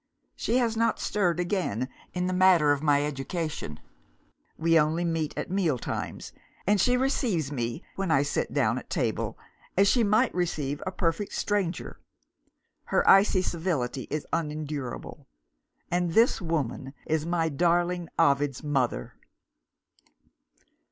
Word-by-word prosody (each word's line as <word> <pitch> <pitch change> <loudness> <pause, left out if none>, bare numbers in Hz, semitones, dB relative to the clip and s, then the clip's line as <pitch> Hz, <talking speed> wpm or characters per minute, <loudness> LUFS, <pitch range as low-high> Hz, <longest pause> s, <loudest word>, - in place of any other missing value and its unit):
She 235 - 0
has 235 -3 +1
not 230 0 +1
stirred 180 -5 0
again, 175 - -1 0.3
in 180 0 0
the 185 - -1
matter 180 -5 +5
of 145 -1 +1
my 145 -1 +3
education. 150 - -4 0.8
We 165 0 +4
only 160 +3 +1
meet 165 -3 -1
at - - -4
meal 175 -8 +1
times; - - -5 0.3
and 205 -1 +3
she 250 +3 +3
receives 230 - 0
me, 120 +3 -3
when 195 -2 -1
I 140 -3 +4
sit 145 - -2
down - - +1
at - - -15
table, - - -1 0.4
as 200 +1 +5
she 240 +3 +4
might 215 +4 +3
receive 150 -5 -2
a - - -1
perfect 180 +2 -1
stranger. 200 -4 -2 0.9
Her - - +1
icy 195 -1 +6
civility 160 -8 -2
is 155 -1 -3
unendurable. 150 -5 -4 0.6
And 175 -1 0
this 230 +1 +4
woman 145 -5 -3
is 160 0 -1
my 170 -1 +1
darling 175 +3 +1
Ovid's 140 0 +2
mother! 135 -5 -1
165 Hz, 135 wpm, -27 LUFS, 145-185 Hz, 0.9 s, icy